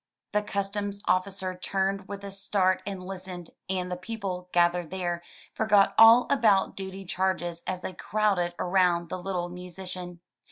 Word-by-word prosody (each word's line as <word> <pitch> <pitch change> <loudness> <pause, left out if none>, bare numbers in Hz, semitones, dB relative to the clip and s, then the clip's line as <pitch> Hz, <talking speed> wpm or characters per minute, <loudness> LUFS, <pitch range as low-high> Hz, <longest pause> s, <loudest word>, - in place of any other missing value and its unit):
The 210 - +2
customs 200 0 -3
officer 185 0 0
turned 195 +1 -1
with 200 0 -7
a 200 - -6
start 195 -1 +1
and 195 -2 -4
listened, 185 -2 -7 0.2
and 180 -1 -1
the - - -1
people, 185 -2 -5
gathered 175 -1 +2
there, 175 -2 -2 0.3
forgot 210 -2 +4
all 225 +2 +8
about 215 -8 +3
duty 190 0 -6
charges 175 -2 -1
as 185 -1 -2
they 185 - -5
crowded 195 -6 0
around 180 -2 +2
the 185 - -4
little 180 -2 -2
musician. 180 0 -7
190 Hz, 150 wpm, -27 LUFS, 180-200 Hz, 0.3 s, all